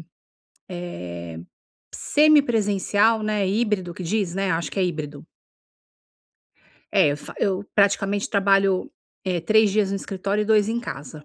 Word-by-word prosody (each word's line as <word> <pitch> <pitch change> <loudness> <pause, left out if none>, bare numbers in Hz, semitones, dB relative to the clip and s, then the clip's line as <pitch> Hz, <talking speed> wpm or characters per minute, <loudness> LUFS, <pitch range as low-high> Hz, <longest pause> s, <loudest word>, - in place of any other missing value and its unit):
eh, - - -11 1.9
semipresencial, 225 -7 +3
né, 210 -2 0
híbrido 200 -4 -1
que 185 - -7
diz, 185 0 -1
né? 195 -1 -1
Acho 165 -2 -1
que - - -6
é - - +3
híbrido. 150 -4 -5 1.7
É, 145 - +4
eu 145 - -2
fa - - -11
eu, 195 0 0
praticamente, 200 0 +1
trabalho, 195 -2 +2 0.3
eh, 180 -2 -1
3 215 +3 +3
dias 200 -1 +1
no 200 - -1
escritório 195 +2 -2
e - - -2
2 210 -1 +3
em 235 +1 -1
casa 150 - -8
200 Hz, 140 wpm, -23 LUFS, 185-215 Hz, 1.9 s, É